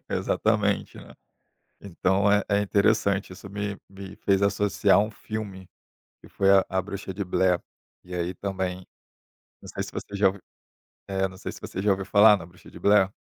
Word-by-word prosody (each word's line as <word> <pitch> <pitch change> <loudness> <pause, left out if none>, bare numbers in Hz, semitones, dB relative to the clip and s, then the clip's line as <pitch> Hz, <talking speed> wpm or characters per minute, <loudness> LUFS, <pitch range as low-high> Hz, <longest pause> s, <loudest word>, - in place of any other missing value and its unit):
exatamente, 105 -2 0
né. - - -12 0.7
Então 100 +1 +1
é 105 -1 +3
é 100 0 +3
interessante, 100 -1 +1
isso 100 - -11
me 100 0 -4
me 95 0 -10
fez 95 0 +1
associar 100 -1 +3
um 105 +2 0
filme, 105 -4 -7 0.5
que - - -16
foi 95 0 +2
A 95 -1 +6
A 95 - 0
Bruxa 100 0 -6
de 100 +2 -4
Blair, 90 -1 +2 0.4
e 90 - -9
aí 90 +1 -2
também 95 -1 -4 0.7
não - - -13
sei - - -4
se - - -7
você 100 - -6
já 100 - +3
ouviu 95 +1 +1 0.7
eh, 95 0 0
não 95 0 -13
sei - - -6
se - - -11
você 95 - -6
já 105 - +1
ouviu 95 0 -1
falar 105 +1 +6
na 90 - -9
Bruxa 90 +1 -17
de - - -12
Blair. 100 -2 +4
100 Hz, 185 wpm, -26 LUFS, 95-100 Hz, 0.7 s, A